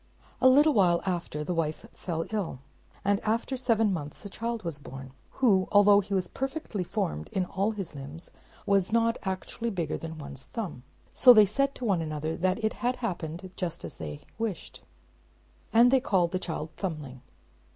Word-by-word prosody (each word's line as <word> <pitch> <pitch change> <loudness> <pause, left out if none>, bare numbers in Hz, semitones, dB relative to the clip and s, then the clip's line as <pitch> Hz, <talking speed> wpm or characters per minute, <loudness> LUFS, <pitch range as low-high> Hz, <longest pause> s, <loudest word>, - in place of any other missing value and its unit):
A 260 - +8
little 295 +4 +6
while 175 -6 +3
after 175 -5 -2
the 180 - -2
wife 160 -2 -2
fell 165 -2 -3
ill; 200 -10 -2 0.5
and 200 0 +3
after 230 +5 -1
seven 225 -5 +2
months 150 +3 -6
a - - -5
child 230 +2 -4
was 165 -4 -4
born, 135 -1 -9 0.2
who, 200 -8 +3
although 205 0 +7
he 200 0 -2
was 185 -2 0
perfectly 270 - -3
formed 75 - -3
in 185 -1 0
all 195 +3 0
his 200 -7 -5
limbs, 145 +4 -8 0.3
was 200 0 +2
not 230 0 +2
actually 190 +4 -3
bigger 170 -7 -2
than 160 -1 -7
one's 140 -3 -9
thumb. 195 - -4 0.3
So 250 -2 +9
they 215 -2 +8
said 275 +7 0
to 250 - -5
one 195 -6 +2
another 155 0 -3
that 185 +5 0
it 220 - +1
had 250 +1 +1
happened 180 -5 -4
just 170 -2 -4
as - - -8
they 75 -2 -6 0.2
wished; 220 -7 -4 0.9
and 240 +2 +6
they 265 - +5
called 185 -9 +1
the 185 - -1
child 160 -3 -4
"Thumbling." 150 -9 -5
190 Hz, 180 wpm, -28 LUFS, 160-225 Hz, 0.9 s, So